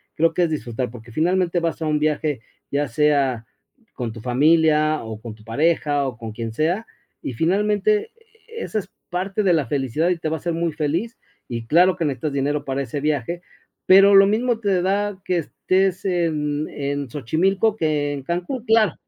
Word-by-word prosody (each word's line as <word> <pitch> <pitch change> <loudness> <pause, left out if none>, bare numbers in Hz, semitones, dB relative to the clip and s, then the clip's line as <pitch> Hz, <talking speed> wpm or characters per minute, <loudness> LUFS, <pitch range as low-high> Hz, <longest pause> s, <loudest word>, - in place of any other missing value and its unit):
creo 165 +1 +2
que 175 - +2
es 170 - +1
disfrutar 125 -5 -3
porque 115 0 -12
finalmente 175 +5 +1
vas 165 -1 -2
a - - -1
un 150 -1 +1
viaje, 150 -3 0 0.3
ya 145 +1 0
sea 135 -3 +1 0.5
con 120 -3 -4
tu 110 - -10
familia 155 +4 +3
o 110 -1 -7
con 115 -2 -8
tu 110 - -19
pareja 145 +3 +1
o 125 -2 -6
con 115 -1 -7
quien 115 +1 -5
sea, 170 - -1 0.3
y 130 - -4
finalmente, 205 - +1 0.4
e 460 0 -8
e - - -3
esa 215 - -2
es 200 - -9 0.2
parte 190 +4 -1
de 185 -3 +4
la 155 -5 +1
felicidad 145 +3 0
y 180 - +1
te 160 - -3
va 160 - -1
a - - -10
hacer 170 +3 -2
muy 165 0 -1
feliz 165 +9 -2 0.3
y 115 -2 -5
claro 180 +6 +5
que 165 - -2
necesitas 145 +1 -2
dinero 145 +1 -1
para 135 0 -2
ese 140 +2 -4
viaje, 150 +3 -1 0.4
pero 195 +1 +7
lo 195 0 +8
mismo 230 +3 +1
te 200 -5 +1
da 200 +1 -1
que 180 - +1
estés 185 +3 0
en 155 -5 0
en 140 -1 -3
Xochimilco 190 - +1
que 150 -5 0
en 140 -2 -6
Cancún, 180 - -3
claro, 220 - +4
155 Hz, 195 wpm, -22 LUFS, 140-185 Hz, 0.5 s, lo